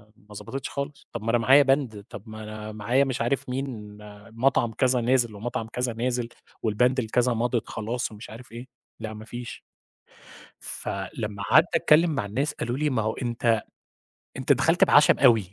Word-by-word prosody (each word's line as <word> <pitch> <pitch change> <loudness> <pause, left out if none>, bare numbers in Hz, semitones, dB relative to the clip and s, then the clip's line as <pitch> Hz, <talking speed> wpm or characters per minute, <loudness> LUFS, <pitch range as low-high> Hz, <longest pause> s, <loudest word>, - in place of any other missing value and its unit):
ما 105 +1 -17
ضبطتش 135 +6 -6
خالص. 140 0 -6
طَب 115 -2 -5
ما 115 - -2
أنا 120 - +4
معايا 135 +5 +6
باند، 135 -7 0
طَب 100 - -9
ما 110 0 -8
أنا 110 0 -7
معايا 115 +6 +1
مش 130 -4 -2
عارف 125 +2 -1
مين 120 -6 -5 0.3
مطعم 120 0 +1
كذا 125 +1 +2
نازل 120 -2 +2
ومطعم 110 +1 -4
كذا 125 +1 -2
نازل 120 +1 -2 0.3
والباند 125 +4 +2
الكذا 120 +2 +1
مَضِت 120 0 -1
خلاص 115 +2 -3
ومش 105 +2 -10
عارف 115 +2 -12
إيه، 120 +2 -9 0.3
لأ، 110 -1 -5
ما 110 0 -10
فيش. 120 +1 -8 1.0
فلما 100 +1 -5
قعدت 155 - +5
أتكلِّم 165 +3 +5
مع 120 - -1
الناس، 135 +9 -2
قالوا 120 +2 -3
لي: 150 +1 +1
"ما 125 -5 0
هو 110 +1 -1
أنت 120 -3 0 0.8
أنت - - +3
دخلت - - +3
بعشَم - - +5
أوي." 115 -9 +4
120 Hz, 175 wpm, -25 LUFS, 110-130 Hz, 1.0 s, معايا